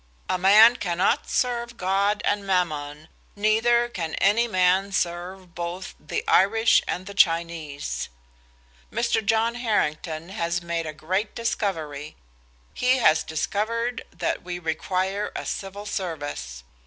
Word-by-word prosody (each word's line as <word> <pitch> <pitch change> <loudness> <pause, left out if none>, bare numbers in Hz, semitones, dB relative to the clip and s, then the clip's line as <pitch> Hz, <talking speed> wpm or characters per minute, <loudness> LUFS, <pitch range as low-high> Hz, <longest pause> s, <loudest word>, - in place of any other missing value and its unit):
A 185 - 0
man 215 +6 +7
cannot 190 +7 0
serve 240 -1 -1
God 195 +3 +1
and 205 0 +1
Mammon, 155 -5 -1 0.3
neither 225 +3 +3
can 170 -9 -4
any 225 +4 +3
man 185 -1 +2
serve 180 0 -3
both 175 +2 -5
the - - -4
Irish 225 +4 +4
and 190 +3 -4
Chinese. 165 -5 0 0.8
"Mr. 235 -2 0
John 225 +2 +2
Harrington 165 -8 -1
has 170 -2 -1
made 170 -1 -2
a - - -3
great 185 +7 -2
discovery. 160 -10 -3 0.6
He 255 +1 +2
has 160 -10 +4
discovered 230 +9 -2
that 175 - -2
we 175 0 -5
require 185 +4 -2
a - - -4
Civil 200 +1 -5
Service. 145 - -5
190 Hz, 120 wpm, -25 LUFS, 170-215 Hz, 0.8 s, man